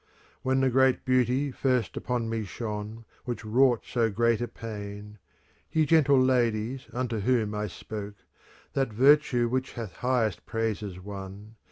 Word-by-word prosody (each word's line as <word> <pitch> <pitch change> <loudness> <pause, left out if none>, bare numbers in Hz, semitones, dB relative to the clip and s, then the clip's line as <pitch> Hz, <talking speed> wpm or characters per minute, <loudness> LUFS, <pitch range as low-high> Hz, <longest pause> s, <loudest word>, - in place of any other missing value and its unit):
'" - - -32
When 130 0 +1
the 130 -1 +3
great 130 +1 +3
beauty 130 +2 +2
first 125 -2 0
upon 120 -2 -2
me 115 -1 -2
shone, 105 +2 -6 0.2
Which 120 -3 -4
wrought 120 +2 +3
so 115 -2 +1
great 115 +2 +1
a 120 - -1
pain, 105 -2 -8 0.2
— - - -37
Ye 160 -1 +3
gentle 145 -3 +5
ladies, 125 -1 +1
unto 120 -3 -2
whom 110 -1 +1
I 105 0 -2
spoke, 105 +1 -7 0.3
— - - -27
That 135 -4 0
virtue 130 0 +4
which 130 +2 -2
hath 110 -7 -7
highest 120 -7 0
praises 110 -4 -2
won. 100 +2 -9
115 Hz, 160 wpm, -28 LUFS, 105-130 Hz, 0.3 s, gentle